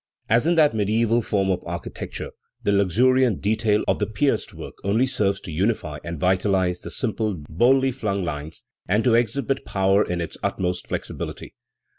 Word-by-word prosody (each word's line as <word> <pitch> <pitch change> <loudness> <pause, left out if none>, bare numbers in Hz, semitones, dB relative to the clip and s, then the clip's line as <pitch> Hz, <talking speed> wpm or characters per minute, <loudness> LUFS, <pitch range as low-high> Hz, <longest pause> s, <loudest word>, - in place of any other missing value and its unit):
As 120 +7 +3
in 170 - +3
that 155 -5 +5
mediaeval 110 +2 +2
form 100 -3 0
of 90 - -1
architecture, - - -6 0.3
the - - +2
luxuriant 115 +4 +3
detail 105 0 +1
of - - +1
the - - 0
pierced 120 +7 0
work - - -9
only 110 +6 +2
serves 100 -6 0
to 85 - -8
unify 85 -3 -1
and 85 -2 -5
vitalise 95 0 +1
the - - -8
simple, 110 -4 -2
boldly 130 +10 +3
flung 100 -7 -2
lines, 75 -1 -6 0.2
and 105 +4 +2
to 125 - +3
exhibit 130 +4 +1
power 95 +1 +2
in 90 0 -3
its 85 - -4
ut - - -2
most 90 -1 -2
flexibility. - - -5
105 Hz, 170 wpm, -23 LUFS, 95-120 Hz, 0.3 s, that